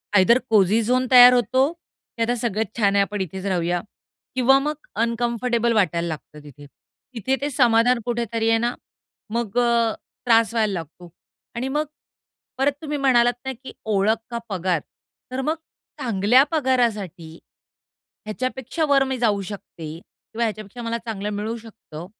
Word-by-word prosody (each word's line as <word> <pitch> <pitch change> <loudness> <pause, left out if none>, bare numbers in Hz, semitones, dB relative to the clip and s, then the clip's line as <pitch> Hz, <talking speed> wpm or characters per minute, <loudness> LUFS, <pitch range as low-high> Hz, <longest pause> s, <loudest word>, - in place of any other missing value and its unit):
Either 205 +6 +6
cosy 215 +1 +4
zone 255 +3 +1
तयार 250 0 +10
होतो 260 +4 +2
की 335 -8 -15
आता 240 +2 0
सगळंच 220 -3 -1
छान 200 -3 +2
आहे 200 - +5
आपण 205 0 -4
इथेच 190 +1 -5
राहूया 175 -2 0 0.5
किंवा 260 +1 +5
मग 300 +2 -2 0.3
अनकम्फर्टेबल 235 0 0
वाटायला 175 -5 +1
लागतं 150 -2 -8
तिथे. 145 0 -13 0.5
तिथे 260 +4 0
ते 290 - -1
समाधान 245 -2 +3
कुठेतरी 230 -2 -1
आहे 225 - +4
ना, 240 +2 0 0.6
मग 230 -1 -3
अ, 235 -2 +2 0.3
त्रास 230 -1 +4
व्हायला 215 -3 +1
लागतो 170 +1 -8 0.5
आणि 250 +3 -2
मग 300 +3 -1 0.7
परत 270 +2 +2
तुम्ही 300 -1 -3
म्हणालात 245 -3 +4
ना 265 - -2
की - - -8 0.2
ओळख 205 +3 +2
का 235 - -2
पगार? 180 -3 0 0.5
तर 260 +1 -2
मग 310 +4 0 0.4
चांगल्या 230 +3 +4
पगारासाठी 230 - 0 0.9
ह्याच्यापेक्षा 255 +7 -3
वर 280 -2 +4
मी 265 -1 -2
जाऊ 210 -4 +1
शकते 185 -4 -8
किंवा 230 +5 -7
ह्याच्यापेक्षा 215 +1 -4
मला 230 0 -2
चांगलं 210 -2 -4
मिळू 215 +3 -3
शकतं, 215 -8 -11
230 Hz, 150 wpm, -22 LUFS, 200-250 Hz, 0.9 s, तयार